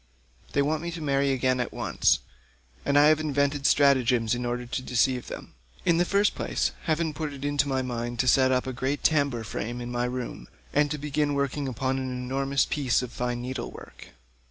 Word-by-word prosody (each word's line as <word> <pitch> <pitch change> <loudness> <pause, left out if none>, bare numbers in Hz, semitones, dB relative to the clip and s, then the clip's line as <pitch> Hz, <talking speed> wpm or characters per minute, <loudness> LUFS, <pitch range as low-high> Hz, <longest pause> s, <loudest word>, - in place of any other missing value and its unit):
They 140 - +3
want 155 +2 0
me 170 - -4
to 170 - -6
marry 140 -2 +1
again 130 -1 +1
at 125 - -2
once, - - +1 0.6
and 140 0 +2
I 145 - +7
have 155 0 +4
to - - -3
invent 140 -1 0
stratagems 125 -5 +3
in 120 0 -2
order 120 0 -2
to 125 +1 -3
deceive 125 0 +1
them. - - -8 0.3
In 170 - +4
the 175 - +3
first 200 +3 +2
place - - -1
heaven 160 0 0
put 155 -1 -4
it 140 0 -7
in 145 0 -2
my 130 -1 0
mind 120 -1 -4
to 130 - -2
set 130 +1 +5
up 125 -1 +1
a 130 - -4
great 135 +3 -2
tambour 140 -7 +2
frame 115 +3 -4
in 120 0 -5
my 120 0 0
room, 125 0 -5 0.3
and 145 0 +3
to 150 - -2
begin 145 0 -1
working 140 0 -1
upon 130 +1 -1
an 130 0 -3
enormous 135 +2 0
piece 130 -4 +1
of 125 - -6
fine 120 0 -3
needlework. 130 +1 -7
135 Hz, 205 wpm, -27 LUFS, 125-145 Hz, 0.6 s, I